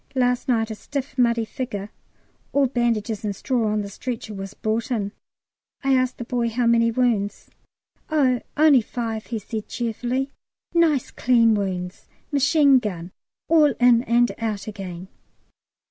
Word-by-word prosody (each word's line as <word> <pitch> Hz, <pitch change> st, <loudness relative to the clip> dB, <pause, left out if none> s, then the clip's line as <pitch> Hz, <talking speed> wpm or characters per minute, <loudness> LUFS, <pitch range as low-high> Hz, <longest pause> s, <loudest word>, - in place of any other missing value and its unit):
Last 250 Hz, -1 st, +1 dB
night 225 Hz, -3 st, +1 dB
a -, -, -2 dB
stiff 275 Hz, +6 st, -5 dB
muddy 235 Hz, -3 st, +2 dB
figure, 210 Hz, -4 st, -5 dB, 0.6 s
all 280 Hz, 0 st, +4 dB
bandages 230 Hz, -4 st, -1 dB
and 205 Hz, -2 st, -2 dB
straw, 240 Hz, 0 st, 0 dB
on 210 Hz, 0 st, 0 dB
the -, -, -6 dB
stretcher 220 Hz, +1 st, -6 dB
was 195 Hz, -1 st, -7 dB
brought 220 Hz, +1 st, -2 dB
in. 210 Hz, -5 st, -1 dB, 0.7 s
I 270 Hz, 0 st, +3 dB
asked 255 Hz, -1 st, +1 dB
the -, -, -5 dB
boy 240 Hz, -1 st, -1 dB
how 240 Hz, +2 st, 0 dB
many 230 Hz, 0 st, +4 dB
wounds? 225 Hz, -4 st, 0 dB, 0.6 s
"Oh, 265 Hz, -6 st, +2 dB, 0.2 s
only 295 Hz, -4 st, +6 dB
five," 225 Hz, -1 st, -4 dB
he 230 Hz, -, -3 dB
said 215 Hz, +1 st, -6 dB
cheerfully. 245 Hz, +3 st, -2 dB, 0.4 s
"Nice 320 Hz, -6 st, +2 dB
clean 230 Hz, -2 st, +3 dB
wounds, 185 Hz, -3 st, -3 dB, 0.2 s
machine 285 Hz, -1 st, +5 dB
gun, 185 Hz, -6 st, -5 dB, 0.4 s
all 305 Hz, -5 st, +4 dB
in 245 Hz, -1 st, +5 dB
and 240 Hz, -1 st, +3 dB
out 215 Hz, -3 st, -3 dB
again!" 190 Hz, -4 st, -7 dB
235 Hz, 145 wpm, -23 LUFS, 215-255 Hz, 0.7 s, only